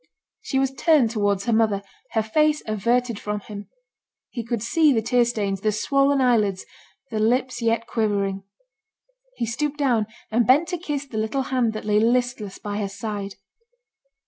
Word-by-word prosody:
She 265 Hz, -, -2 dB
was 270 Hz, 0 st, +1 dB
turned 275 Hz, -5 st, +3 dB
towards 205 Hz, -3 st, 0 dB
her 235 Hz, -, +1 dB
mother, 215 Hz, -3 st, +2 dB, 0.3 s
her 220 Hz, -, +2 dB
face 305 Hz, +7 st, +2 dB
averted 235 Hz, +2 st, 0 dB
from 210 Hz, 0 st, -4 dB
him; 205 Hz, 0 st, -9 dB, 0.6 s
he 235 Hz, -, -4 dB
could 230 Hz, -1 st, -3 dB
see 310 Hz, +5 st, +3 dB
the 230 Hz, -4 st, +2 dB
tear 245 Hz, +1 st, +3 dB
stains, 200 Hz, -5 st, -2 dB
the 215 Hz, -, +1 dB
swollen 275 Hz, +6 st, +2 dB
eyelids, 215 Hz, -7 st, +2 dB, 0.5 s
the 220 Hz, -, -2 dB
lips 245 Hz, +2 st, +1 dB
yet 230 Hz, 0 st, +1 dB
quivering: 200 Hz, -4 st, -1 dB, 0.9 s
he -, -, -2 dB
stooped 280 Hz, +6 st, -2 dB
down, 245 Hz, -7 st, +1 dB, 0.2 s
and 230 Hz, 0 st, +2 dB
bent 295 Hz, +6 st, +5 dB
to 355 Hz, -2 st, -3 dB
kiss 295 Hz, -4 st, -3 dB
the 230 Hz, -5 st, -5 dB
little 220 Hz, +5 st, -1 dB
hand 240 Hz, -3 st, +2 dB
that 215 Hz, -, -6 dB
lay 210 Hz, 0 st, +3 dB
listless 235 Hz, -3 st, 0 dB
by 205 Hz, -1 st, -5 dB
her 205 Hz, -2 st, -2 dB
side. 200 Hz, -1 st, -5 dB
230 Hz, 170 wpm, -23 LUFS, 210-255 Hz, 0.9 s, bent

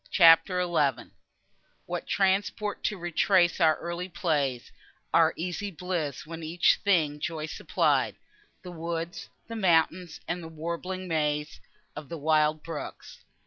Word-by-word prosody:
CHAPTER 170 Hz, +1 st, +6 dB
XI 155 Hz, -7 st, 0 dB, 0.7 s
What -, -, -5 dB
transport 200 Hz, +2 st, 0 dB
to 210 Hz, -, 0 dB
retrace 175 Hz, +1 st, +2 dB
our 160 Hz, -1 st, +5 dB
early 170 Hz, +2 st, -5 dB
plays, 145 Hz, -8 st, -1 dB, 0.4 s
Our 165 Hz, -1 st, +5 dB
easy 180 Hz, +4 st, -3 dB
bliss, 165 Hz, -6 st, -4 dB
when 165 Hz, +1 st, -8 dB
each 165 Hz, +2 st, +2 dB
thing 160 Hz, -8 st, +2 dB
joy 155 Hz, 0 st, -3 dB
supplied 155 Hz, -, 0 dB, 0.5 s
The 180 Hz, -, -8 dB
woods, 170 Hz, 0 st, -5 dB, 0.2 s
the 230 Hz, -, -6 dB
mountains 175 Hz, -3 st, +1 dB
and 175 Hz, +1 st, -2 dB
the 165 Hz, -, -8 dB
warbling 170 Hz, +4 st, -5 dB
maze 150 Hz, -2 st, -1 dB, 0.3 s
Of 150 Hz, -2 st, -8 dB
the 170 Hz, -, -5 dB
wild 155 Hz, 0 st, +2 dB
brooks! 165 Hz, -3 st, -8 dB
165 Hz, 130 wpm, -28 LUFS, 155-180 Hz, 0.7 s, CHAPTER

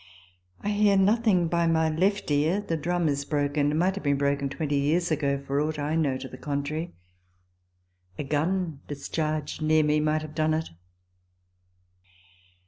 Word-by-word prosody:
I 205 Hz, -, -2 dB
hear 205 Hz, -1 st, +3 dB
nothing 200 Hz, -3 st, +3 dB
by 170 Hz, 0 st, +1 dB
my 160 Hz, -1 st, +2 dB
left 185 Hz, +3 st, 0 dB
ear. 155 Hz, +7 st, +2 dB
The 205 Hz, -5 st, -2 dB
drum 170 Hz, +2 st, 0 dB
is 140 Hz, -1 st, 0 dB
broken, 145 Hz, 0 st, 0 dB
and 150 Hz, -, 0 dB
might 185 Hz, +3 st, +2 dB
have 200 Hz, -, -6 dB
been 140 Hz, -1 st, +2 dB
broken 140 Hz, 0 st, 0 dB
twenty 145 Hz, 0 st, -2 dB
years 165 Hz, +5 st, +1 dB
ago, 140 Hz, -2 st, 0 dB
for 140 Hz, +1 st, 0 dB
aught 155 Hz, 0 st, -2 dB
I 150 Hz, +2 st, -1 dB
know 145 Hz, -5 st, +1 dB
to 130 Hz, 0 st, -7 dB
the 130 Hz, -, -11 dB
contrary. 150 Hz, +3 st, -3 dB, 1.2 s
A -, -, -3 dB
gun 160 Hz, +2 st, -1 dB
discharged 155 Hz, +1 st, -3 dB
near 155 Hz, 0 st, +3 dB
me 150 Hz, 0 st, +2 dB
might 155 Hz, +1 st, 0 dB
have 155 Hz, -1 st, -8 dB
done 155 Hz, 0 st, +1 dB
it. 160 Hz, 0 st, -3 dB
155 Hz, 165 wpm, -26 LUFS, 145-170 Hz, 1.2 s, hear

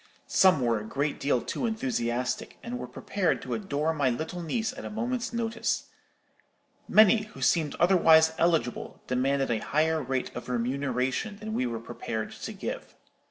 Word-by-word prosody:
Some 185 Hz, -7 st, +4 dB
were 115 Hz, -3 st, +2 dB
a -, -, -7 dB
great 140 Hz, +6 st, -2 dB
deal 135 Hz, -3 st, +1 dB
too 240 Hz, -, -2 dB
enthusiastic, 125 Hz, -, -2 dB
and 245 Hz, +1 st, -5 dB
were -, -, -5 dB
prepared 185 Hz, -5 st, -1 dB
to -, -, -4 dB
adore 160 Hz, -6 st, -1 dB
my 145 Hz, -4 st, +1 dB
little 160 Hz, +8 st, -3 dB
niece 220 Hz, +8 st, -2 dB
at 270 Hz, -, -9 dB
a -, -, -5 dB
moment's 235 Hz, +1 st, -2 dB
notice. 230 Hz, -1 st, -1 dB, 1.0 s
Many, 215 Hz, 0 st, +6 dB
who 215 Hz, -, -13 dB
seemed 160 Hz, -4 st, +2 dB
otherwise 160 Hz, -3 st, +5 dB
eligible, 165 Hz, -7 st, 0 dB
demanded 135 Hz, +1 st, +1 dB
a 115 Hz, -, +1 dB
higher 160 Hz, +4 st, +1 dB
rate 130 Hz, -1 st, -3 dB
of -, -, -7 dB
remuneration 130 Hz, -, -1 dB
than 220 Hz, +1 st, -6 dB
we 130 Hz, -, 0 dB
were 115 Hz, -1 st, -3 dB
prepared 115 Hz, -1 st, -5 dB
to -, -, -7 dB
give. -, -, -6 dB
160 Hz, 160 wpm, -28 LUFS, 125-215 Hz, 1.0 s, Many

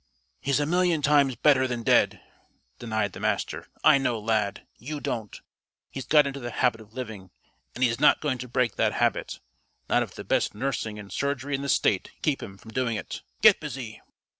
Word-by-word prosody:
"He's 140 Hz, 0 st, +1 dB
a 145 Hz, -, +1 dB
million 175 Hz, -1 st, +1 dB
times 140 Hz, -3 st, +4 dB
better 130 Hz, -1 st, +4 dB
than 120 Hz, -2 st, -4 dB
dead," -, -, +3 dB, 0.6 s
denied 110 Hz, -4 st, -2 dB
the -, -, -9 dB
Master. -, -, -2 dB, 0.2 s
"I 150 Hz, -3 st, +7 dB
know 125 Hz, -3 st, 0 dB
Lad. 105 Hz, -2 st, -1 dB
You 150 Hz, +5 st, -5 dB
don't. 110 Hz, -6 st, -4 dB, 0.5 s
He's 135 Hz, -, -6 dB
got 150 Hz, -1 st, +6 dB
into 140 Hz, 0 st, -4 dB
the 120 Hz, -2 st, -5 dB
habit 120 Hz, -1 st, 0 dB
of 110 Hz, 0 st, -17 dB
living, 110 Hz, -7 st, -7 dB, 0.5 s
and 125 Hz, -, -1 dB
he's 120 Hz, -2 st, +2 dB
not -, -, +5 dB
going 140 Hz, -5 st, -2 dB
to 125 Hz, -, -6 dB
break 120 Hz, -2 st, 0 dB
that -, -, +2 dB
habit, -, -, 0 dB, 0.5 s
not -, -, +3 dB
if -, -, -5 dB
the -, -, -7 dB
best -, -, 0 dB
nursing 110 Hz, -3 st, -3 dB
and 100 Hz, -1 st, -10 dB
surgery 140 Hz, 0 st, -2 dB
in 135 Hz, -, -1 dB
the 140 Hz, -, -4 dB
State 95 Hz, -7 st, +2 dB
can -, -, -36 dB
keep 150 Hz, -4 st, +1 dB
him 95 Hz, -, -9 dB
from 110 Hz, -, -13 dB
doing 120 Hz, -1 st, -1 dB
it. 95 Hz, -, -6 dB, 0.2 s
Get -, -, +8 dB
busy!" 120 Hz, -5 st, -7 dB
125 Hz, 200 wpm, -26 LUFS, 110-140 Hz, 0.6 s, Get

